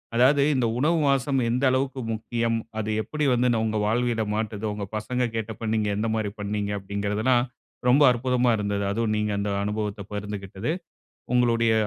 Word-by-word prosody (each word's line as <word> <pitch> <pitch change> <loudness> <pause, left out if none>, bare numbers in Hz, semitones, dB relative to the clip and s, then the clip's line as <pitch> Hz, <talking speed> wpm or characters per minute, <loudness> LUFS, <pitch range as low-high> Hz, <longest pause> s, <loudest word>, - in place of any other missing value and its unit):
அதாவது 135 +4 +5
இந்த 125 -2 +2
உணவு 160 +4 +3
வாசம் 135 0 +2
எந்த 125 +3 0
அளவுக்கு 130 0 -1
முக்கியம். 115 +1 -1 0.2
அது 110 0 -2
எப்படி 150 -1 -3
வந்து 125 +1 +2
நம்ம 110 -1 0
வாழ்வியல 115 0 +1
மாட்றுது, 110 -1 -3
உங்க 105 -1 -4
பசங்க 125 +3 -1
கேட்டப்ப 110 0 -3
நீங்க 105 -1 +1
எந்த 110 +1 0
மாதிரி 105 -2 -1
பண்ணீங்க, 105 0 -2
அப்பங்கிறதெல்லாம் 105 +5 +1 0.4
ரொம்ப 140 +4 +6
அற்புதமா 125 0 +2
இருந்தது. 100 -1 -1
அதுவும் 110 0 0
நீங்க 105 0 0
அந்த 100 0 -1
அனுபவத்தை 105 -1 -3
பகிர்ந்துகிட்டது. 105 +3 -4 0.6
உங்களுடைய 115 -2 +3
110 Hz, 150 wpm, -25 LUFS, 105-125 Hz, 0.6 s, ரொம்ப